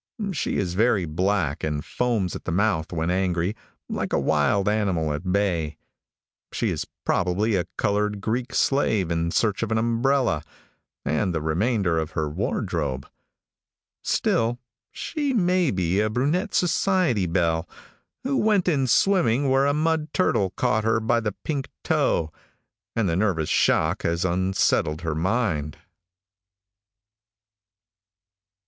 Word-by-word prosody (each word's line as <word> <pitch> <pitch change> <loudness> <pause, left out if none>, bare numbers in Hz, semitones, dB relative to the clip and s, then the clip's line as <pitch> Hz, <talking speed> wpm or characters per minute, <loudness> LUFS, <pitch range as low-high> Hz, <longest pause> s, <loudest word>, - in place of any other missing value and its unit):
She 160 - -2
is 90 -3 -1
very 105 -2 +2
black, 85 -1 -1
and 75 -1 -2
foams 115 -7 -1
at - - -8
the - - -2
mouth 90 -3 0
when 85 0 -1
angry, 90 +1 0 0.3
like - - -3
a - - +3
wild 80 +8 +1
animal 95 -8 +1
at 90 +5 -3
bay. 90 -6 0 0.7
She - - -1
is - - -3 0.2
probably 100 +5 +1
a 90 -3 0
colored 105 0 0
Greek 120 +5 -2
slave 110 - +1
in 85 0 0
search 105 +3 +1
of 115 -1 -2
an 110 - +2
umbrella 115 - +1 0.6
and 85 +4 0
the - - +1
remainder 90 +1 +1
of 80 +2 -4
her 80 -3 -1
wardrobe. 75 - -2 1.0
Still, 115 +1 +1 0.3
she 290 -4 -2
may 180 -5 +2
be 95 -1 0
a 110 +1 +2
brunette 150 - 0
society 180 - +2
belle, 85 -2 0 0.5
who 270 +1 0
went 210 -6 +2
in 140 -7 +2
swimming 140 - +3
where 135 +1 +3
a 140 - +2
mud 160 0 0
turtle 100 - +2
caught 110 -4 +1
her 110 0 +2
by 115 +1 +1
the 105 -3 -2
pink 140 -4 -2 0.2
toe, 80 -1 +1 0.6
and 115 -3 +1
the 85 - 0
nervous 90 -5 0
shock 80 +5 +2
has 85 +2 0
unsettled 90 -3 +1
her 80 -2 -2
mind. 80 - -1
100 Hz, 135 wpm, -24 LUFS, 85-125 Hz, 1.0 s, a